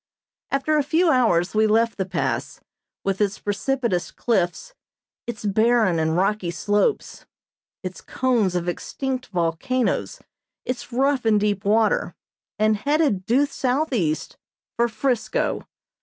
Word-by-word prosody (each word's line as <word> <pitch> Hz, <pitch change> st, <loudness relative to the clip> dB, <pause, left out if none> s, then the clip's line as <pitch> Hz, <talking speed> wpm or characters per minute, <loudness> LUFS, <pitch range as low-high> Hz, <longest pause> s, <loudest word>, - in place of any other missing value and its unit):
After 290 Hz, +3 st, +1 dB
a -, -, +2 dB
few 320 Hz, +4 st, +3 dB
hours 190 Hz, -9 st, +2 dB
we 215 Hz, 0 st, +3 dB
left 225 Hz, +2 st, +2 dB
the 190 Hz, -, -1 dB
Pass, 185 Hz, -3 st, -2 dB, 0.4 s
with 195 Hz, +1 st, -1 dB
its 200 Hz, -1 st, +1 dB
precipitous 220 Hz, -2 st, -1 dB
cliffs, 230 Hz, -, -1 dB, 0.5 s
its 220 Hz, -3 st, -5 dB
barren 215 Hz, -3 st, +3 dB
and 160 Hz, +1 st, +1 dB
rocky 195 Hz, -1 st, +1 dB
slopes, 205 Hz, -, -1 dB, 0.6 s
its 185 Hz, 0 st, -6 dB
cones 235 Hz, -8 st, 0 dB
of 175 Hz, 0 st, -1 dB
extinct 260 Hz, +8 st, -3 dB
volcanoes, 180 Hz, +8 st, -1 dB, 0.5 s
its 250 Hz, 0 st, -4 dB
rough 270 Hz, +2 st, +1 dB
and 220 Hz, -2 st, +3 dB
deep 205 Hz, -1 st, 0 dB
water, 215 Hz, +1 st, +2 dB, 0.4 s
and 215 Hz, 0 st, +3 dB
headed 280 Hz, -, +1 dB
due 265 Hz, +5 st, +4 dB
southeast 250 Hz, -, -1 dB, 0.4 s
for 235 Hz, 0 st, +2 dB
"Frisco." 255 Hz, -, -1 dB
220 Hz, 125 wpm, -23 LUFS, 190-260 Hz, 0.6 s, due